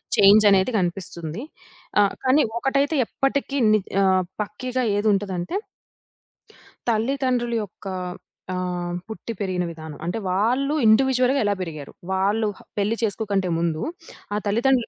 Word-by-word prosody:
Change 205 +2 +7
అనేది 195 +5 +4
కనిపిస్తుంది. 175 -1 -3 0.6
ఆహ్, 200 -1 +4
కానీ 265 +3 +4 0.2
ఒకటైతే 275 +4 +1
ఎప్పటికీ 275 +3 -1
ని 215 - +5 0.6
పక్కీగా 250 +5 -3 0.2
ఏదుంటదంటే 200 - 0 1.3
తల్లిదండ్రుల 240 +1 +1
యొక్క 195 0 -11 0.7
ఆహ్, 180 -1 -2
పుట్టి 225 +1 -6
పెరిగిన 185 -3 -1
విధానం. 160 -2 -9
అంటే 175 +6 -2
వాళ్ళు 245 +10 +1
ఇండివిడ్యువల్‌గా 255 +4 +4
ఎలా 205 -1 +2
పెరిగారు? 155 -6 -6 0.2
వాళ్ళు 205 +3 +1 0.3
పెళ్లి 205 +3 +1
చేసుకోకంటే 205 -3 0
ముందు 165 -1 -1 0.5
ఆ - - 0
తల్లిదండ్రులు 235 +4 +2
210 Hz, 110 wpm, -23 LUFS, 185-250 Hz, 1.3 s, Change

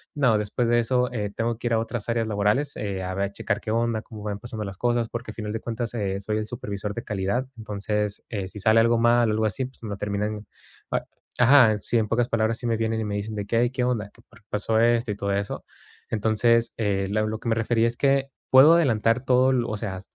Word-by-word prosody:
No, 125 -7 +3
después 105 +3 -1
de 120 0 +4
eso, 125 +2 +1
eh, 105 -4 -2
tengo 115 0 -1
que 120 - -4
ir 120 - +1
a 110 - +3
otras 115 0 -4
áreas 115 -1 0
laborales, 105 +7 +1
eh, 100 -3 -3
a 95 0 -3
ver, 100 +1 -1
checar 105 +1 -2
qué 110 - -4
onda, 115 -1 0
cómo 110 -2 -11
van 105 -1 -4
pasando 110 -1 -6
las 100 -1 -7
cosas, 120 0 +1
porque 120 +1 -6
al - - -14
final 105 -1 -4
de 115 - -2
cuentas, 115 +1 -4
eh, 100 -4 -2
soy 105 +2 -2
el 110 0 -3
supervisor 105 -3 -5
de 115 - -4
calidad. 105 +4 -1
Entonces, 105 -1 -3
eh, 100 -4 -3
si 105 - -9
sale 110 +3 +4
algo 115 +1 +4
mal 120 0 +4
o - - +2
algo 110 +1 +1
así, 110 +5 -1
pues 130 +1 -13
me 110 - -5
lo 100 - -4
terminan 105 +1 -3 0.4
ap - - 0 0.3
ajá, 125 -3 +6
sí. 105 +4 -1
En 110 - 0
pocas 115 +2 +1
palabras 115 -1 0
sí 120 - -7
me 115 - +1
vienen 110 0 -1
y 110 - -2
me 105 -1 -3
dicen 105 +2 -4
de 105 -1 -3
qué: 115 +3 0
"Ay, 120 +1 +3
¿qué 130 0 -2
onda?, 115 -5 -1
¿qué 115 - -20
por 115 - -19
qué - - -41
pasó 110 +1 0
esto?, 115 -1 +3
y - - -3
todo 100 0 -2
eso. 100 +1 -3 0.5
Entonces, 115 +2 +2
eh, 100 -3 0
la 105 +1 +1
lo 110 0 -2
que 115 - -4
me 115 - +2
refería 115 0 +2
es 115 - -3
que, 135 0 +2 0.2
puedo 135 +5 +8
adelantar 120 -7 +2
todo 130 0 +4
lo 120 -2 0
o 110 - -3
sea, 95 -2 -4
110 Hz, 260 wpm, -25 LUFS, 105-120 Hz, 0.5 s, puedo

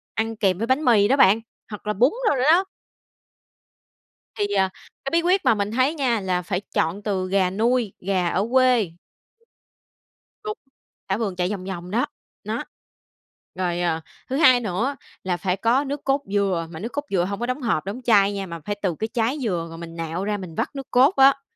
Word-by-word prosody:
ăn 225 +1 -1
kèm 190 -4 +2
với 230 +3 -2
bánh 265 +4 +1
mì 210 -4 +5
đó 275 - +3
bạn, 205 -2 +6 0.3
hoặc 210 0 -9
là 210 - +1
bún 250 +8 +4 0.2
rồi - - +2
nữa 250 - +1
đó. 370 +3 +4 1.7
Thì, 205 - 0
à, 190 -1 +2 0.4
cái - - 0
bí 335 0 +3
quyết 365 +3 +2
mà - - +6
mình 205 +1 -2
thấy 260 +6 +2
nha, 250 -6 +1
là 185 -2 -1
phải 180 +1 -2
chọn 165 +6 0
từ 190 -3 -1
gà 190 -2 +2
nuôi, 225 +2 +1
gà 185 -2 0
ở 195 +5 0
quê. 250 -8 +4 1.5
Đúng, 425 +1 -4 0.5
thả 190 - +1
vườn 205 -5 -2
chạy 180 +1 0
vòng 190 -3 -4
vòng 180 -1 -6
đó, 235 +3 +1 0.4
đó. - - -3 0.9
Rồi, 175 -1 -1
ờ, 165 -2 0 0.3
thứ 265 - -1
hai 255 -6 +6
nữa 230 +6 -1 0.3
là 180 -2 -1
phải 185 0 -1
có 240 +7 +2
nước 285 +1 -5
cốt 275 +1 +2
dừa, 190 -5 +1
mà 160 - -8
nước 230 +5 -4
cốt 290 0 -3
dừa 180 -3 +1
hông 200 +2 -4
có 240 - -1
đóng 255 +3 -3
hộp, 200 -9 0
đóng 215 +6 -5
chai 205 -3 +4
nha, 195 -1 -3
mà 170 -1 -7
phải 205 - -2
từ 180 -5 0
cái 220 - -1
trái 235 +5 0
dừa, 175 -6 -1
rồi 165 - -9
mình 165 0 -9
nạo 165 +3 -3
ra 210 0 -1
mình 180 -4 -8
vắt - - -2
nước 270 -1 -6
cốt 265 +8 +5
á. 275 +1 +6
205 Hz, 210 wpm, -23 LUFS, 185-255 Hz, 1.7 s, bạn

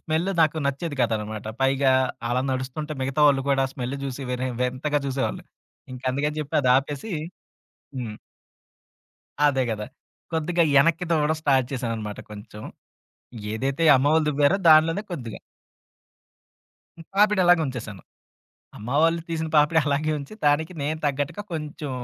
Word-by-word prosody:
Smell 160 +3 -1
నాకు 160 0 +3
నచ్చేది 140 +2 -3
కదనమాట. 110 -2 -2 0.2
పైగా 135 0 +3 0.4
అలా 125 +2 0
నడుస్తుంటే, 130 +4 -4
మిగతా 135 +3 -1
వాళ్ళు 135 -1 +2
కూడా 135 -1 +3
స్మెల్ 130 +1 -4
చూసి 135 0 -5
వేరే 125 +1 -2
వింతగా 130 +4 0
చూసేవాళ్ళు. 135 0 -2 0.5
ఇంకందుకని 140 +4 -2
చెప్పి 150 - -6
అది 130 -3 +2
ఆపేసి 145 +9 -3 0.8
హ్మ్. 115 -5 -5 1.3
అదే 135 -2 +2
కదా! 105 -1 -4 0.5
కొద్దిగా 170 +2 +1
యెనక్కి 165 +5 +4
దువ్వడం 155 -1 +2
స్టార్ట్ 135 -4 +3
చేశాననమాట 115 -5 -4
కొంచెం. 105 0 -10 0.9
ఏదైతే 135 +7 -1
అమ్మవళ్ళ 150 +4 +3
దువ్వారో 145 +5 +3
దానిలోనే 160 +5 +5
కొద్దిగా. 120 -10 -6 1.6
హ్మ్. 165 - -11
పాపిడలాగా 185 -5 +4
ఉంచేేశాను. 110 -8 -7 0.7
అమ్మ 110 - -9
వాళ్ళు 165 +1 +3
తీసిన 160 -1 -2
పాపిడి 150 +2 +4
అలాగే 150 +2 0
ఉంచి. 140 +4 -9
దానికి 155 +4 +2
నేను 155 +2 -2
తగ్గట్టుగా 145 +7 -2
కొంచెం 150 -2 -5
140 Hz, 125 wpm, -24 LUFS, 130-155 Hz, 1.6 s, దానిలోనే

